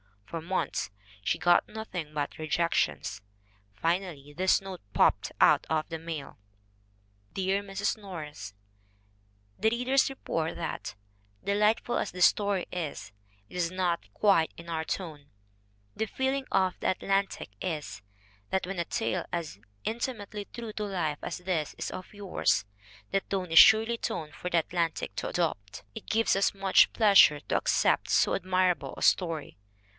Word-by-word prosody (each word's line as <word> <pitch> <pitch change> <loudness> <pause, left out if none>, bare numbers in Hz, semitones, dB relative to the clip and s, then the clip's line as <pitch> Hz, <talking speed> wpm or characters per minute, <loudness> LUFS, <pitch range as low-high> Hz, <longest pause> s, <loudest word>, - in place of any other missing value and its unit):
For 165 +8 -5
months 185 - -2 0.3
she - - +1
got 175 0 +4
nothing 180 -8 -6
but 145 -1 -3
rejections. 155 - 0 0.5
Finally 165 - -2
this 185 +2 +3
note 190 -2 -7
popped - - +3
out - - +5
of 155 -1 0
the 165 -1 -4
mail: 160 -3 -6 1.0
"Dear 195 +1 0
Mrs. 200 +1 -2
Norris: 150 - -8 1.0
"The 220 - +4
readers 250 +4 +2
report 165 -11 -3
that, 165 - -5 0.5
delightful 210 +4 +2
as - - -2
this 180 0 +4
story 200 -3 0
is, 165 - -5 0.4
it - - -8
is 170 -2 +1
'not 180 -2 -1
quite 195 -6 +3
in 170 0 -11
our 160 -1 -2
tone/ 155 -5 -5 0.7
The 220 - 0
feeling 265 +4 -1
of 185 -1 +1
the - - -1
At 185 - 0
lantic 195 - 0
is, 155 - -4 0.5
that 190 - 0
when 185 -1 -4
a 170 - 0
tale 115 -7 -1
is 165 - -3
as - - -28 0.2
intimately 215 -3 -4
true 230 0 -7
to 210 - -3
life 170 -7 -2
as - - -4
this 175 -4 -2
is - - -4
of 185 - -8
yours, 190 - +1 0.5
the 195 - +3
tone 190 -3 -4
is 165 - +9
surely 220 +1 +7
a - - -9
tone 165 -11 -4
for 180 - -5
the 170 - +3
Atlantic 165 0 -2
to - - -2
adopt. 105 - -2
"It 220 - -9
gives 225 -2 +2
us 195 - +2
much 195 -1 +5
pleasure 200 -9 +6
to - - 0
accept - - +2
so - - +3
admirable 185 -1 +1
a - - -8
story. 165 - +1
180 Hz, 155 wpm, -29 LUFS, 160-200 Hz, 1.0 s, is